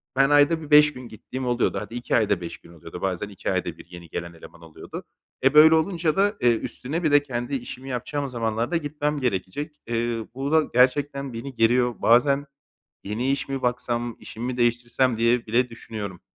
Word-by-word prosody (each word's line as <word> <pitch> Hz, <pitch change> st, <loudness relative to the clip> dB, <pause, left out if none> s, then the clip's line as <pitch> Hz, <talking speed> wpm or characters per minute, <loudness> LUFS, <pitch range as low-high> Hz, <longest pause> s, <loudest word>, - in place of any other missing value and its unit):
ben 135 Hz, +1 st, +4 dB
ayda 145 Hz, +3 st, +4 dB
bir 150 Hz, -, -9 dB
5 150 Hz, 0 st, +7 dB
gün 125 Hz, -1 st, -9 dB
gittiğim 125 Hz, +4 st, -7 dB
oluyordu. 120 Hz, -4 st, +1 dB
Hadi, 110 Hz, +3 st, -8 dB
2 120 Hz, -, -1 dB
ayda 105 Hz, -5 st, +2 dB
5 85 Hz, -, -6 dB
gün 85 Hz, -, -17 dB
oluyordu. 85 Hz, +1 st, -10 dB
Bazen 95 Hz, +1 st, -2 dB
2 100 Hz, -, -4 dB
ayda -, -, -2 dB
bir -, -, -13 dB
yeni 85 Hz, -2 st, -12 dB
gelen 85 Hz, +1 st, -5 dB
eleman 85 Hz, +1 st, -14 dB
oluyordu. 80 Hz, -1 st, -9 dB, 0.4 s
E, 135 Hz, +1 st, +4 dB
böyle 155 Hz, +1 st, +8 dB
olunca 165 Hz, -1 st, 0 dB
da, 205 Hz, +2 st, +2 dB
eee, 120 Hz, -2 st, +4 dB
üstüne 150 Hz, +9 st, -5 dB
bir 155 Hz, -, +2 dB
de 145 Hz, 0 st, +5 dB
kendi 120 Hz, 0 st, -3 dB
işimi 130 Hz, +1 st, -7 dB
yapacağım 135 Hz, +3 st, -3 dB
zamanlar 115 Hz, 0 st, -2 dB
da 170 Hz, -, +2 dB
gitmem 150 Hz, -1 st, -2 dB
gerekecek. 130 Hz, +6 st, -3 dB
Eee, 115 Hz, -1 st, -2 dB
bu 135 Hz, +2 st, -3 dB
da 160 Hz, 0 st, +5 dB
gerçekten 140 Hz, +2 st, +2 dB
beni 130 Hz, +3 st, -7 dB
geriyor. 120 Hz, +1 st, +3 dB
Bazen 140 Hz, +5 st, +4 dB, 0.6 s
"Yeni 115 Hz, +7 st, -1 dB
iş 140 Hz, 0 st, -2 dB
mi 135 Hz, -1 st, -3 dB
baksam, 120 Hz, -1 st, -2 dB
işimi 115 Hz, +2 st, -8 dB
mi 125 Hz, 0 st, -3 dB
değiştirsem?" 120 Hz, +1 st, +1 dB
diye 115 Hz, +1 st, +2 dB
bile 120 Hz, +3 st, +2 dB
düşünüyorum. 105 Hz, -5 st, -7 dB
125 Hz, 195 wpm, -24 LUFS, 115-145 Hz, 0.6 s, böyle